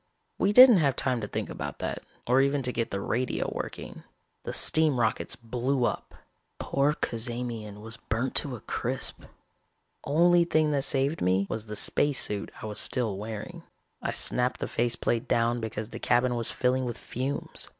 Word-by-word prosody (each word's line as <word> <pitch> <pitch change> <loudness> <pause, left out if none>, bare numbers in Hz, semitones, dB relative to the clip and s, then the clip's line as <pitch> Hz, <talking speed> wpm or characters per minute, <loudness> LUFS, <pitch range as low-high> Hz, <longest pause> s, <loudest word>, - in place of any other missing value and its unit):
"We 200 - +3
didn't 250 0 +9
have 140 -6 +2
time 125 -3 0
to 105 - -4
think - - -3
about - - -6
that, - - -4 0.2
or 125 +2 +4
even 140 0 +1
to 125 - +1
get 115 -2 -2
the 100 - -3
radio 120 +5 -1
working. - - -6 0.4
The - - -3
steam 155 -5 +3
rockets 110 -2 0
blew 125 +2 -1
up. - - -3 0.4
Poor 140 +2 +1
Cazamian 115 -4 -4
was 115 +1 -7
burnt 115 +4 -2
to 140 -5 -1
a 110 - -10
crisp. 130 +4 -2 0.8
Only 170 +4 +4
thing 155 -2 +2
that 140 -1 0
saved 140 +4 0
me 95 +2 +2
was 110 0 -4
the 105 - -5
spacesuit 130 -6 0
I - - -3
was 105 -1 -3
still 115 -6 0
wearing. 105 +1 -6 0.4
I - - -2
snapped 125 0 +1
the - - -2
face 120 0 0
plate 120 +2 -1
down 115 +1 +2
because 110 -1 -5
the - - -7
cabin 125 +1 +2
was 115 -1 +1
filling 130 +1 +1
with 120 - -4
fumes. 130 +3 -4
125 Hz, 175 wpm, -28 LUFS, 115-140 Hz, 0.8 s, didn't